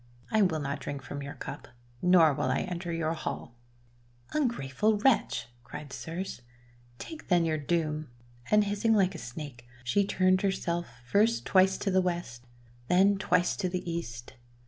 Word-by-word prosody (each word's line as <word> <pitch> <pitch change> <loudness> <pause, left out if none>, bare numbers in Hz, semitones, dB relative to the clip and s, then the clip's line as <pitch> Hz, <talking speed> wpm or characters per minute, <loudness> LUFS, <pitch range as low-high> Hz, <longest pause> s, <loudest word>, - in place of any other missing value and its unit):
I 220 - +4
will 180 -5 +3
not 140 -1 -3
drink 140 -2 -5
from 145 +1 -6
your 140 +1 -6
cup, - - -7 0.3
nor 175 -4 +6
will - - -1
I - - +1
enter 175 -1 -4
your 165 -1 0
hall!' 135 -6 -5 0.4
" 120 0 -24
Ungrateful 215 - +1
wretch! 235 - +2
" 120 - -31
cried 140 +2 -8
Circe. 165 +4 -5 0.3
" - - -29 0.2
Take 320 - -9
then 175 -2 +4
your 155 -1 0
doom!' 155 -1 -1 0.4
And 210 0 +5
hissing 205 +2 +1
like 195 -2 +3
a 165 - -7
snake, 125 -2 -8 0.2
she 160 +12 +2
turned 185 -1 +2
herself 175 -3 -1 0.2
first 215 - +2
twice 190 0 +4
to 195 - -1
the 190 0 +4
west, 170 -9 -3 0.4
then 195 +4 +4
twice 180 -2 +2
to 185 -3 -1
the 180 0 -4
east. 125 -9 -5
170 Hz, 170 wpm, -29 LUFS, 140-195 Hz, 0.4 s, nor